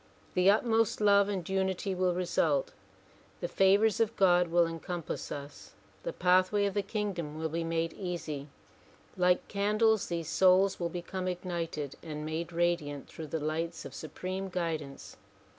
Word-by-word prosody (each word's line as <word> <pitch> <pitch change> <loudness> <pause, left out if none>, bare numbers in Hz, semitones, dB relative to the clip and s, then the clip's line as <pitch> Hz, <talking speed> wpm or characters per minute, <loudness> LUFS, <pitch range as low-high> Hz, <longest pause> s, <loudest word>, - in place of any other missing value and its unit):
The 180 +1 +4
utmost 225 +1 +2
love 200 -1 +5
and 190 -5 -3
unity 190 0 -1
will 185 -1 +1
result, 160 -5 +1 0.7
the - - -2
favors 200 +3 +3
of 225 0 +1
God 180 -2 +4
will 170 +1 +4
encompass 165 0 -5
us, 140 0 -8 0.3
the - - -3
pathway 185 - +3
of 200 - -1
the 205 - +1
kingdom 195 -7 -3
will 160 0 -2
be 165 +2 -2
made 165 0 -1
easy. 165 -6 -5 0.7
Like 180 0 +2
candles 215 +1 +2
these 170 -2 -3
souls 190 +1 +4
will 170 -1 -1
become 180 +2 -4
ignited 170 -5 -4
and 150 -2 -6
made 160 +2 -3
radiant 170 -5 -1
through 160 - -8
the 160 +2 -2
lights 160 +2 -3
of 135 - -8
supreme 185 +6 -5
guidance. 160 -6 -4
180 Hz, 150 wpm, -30 LUFS, 165-195 Hz, 0.7 s, love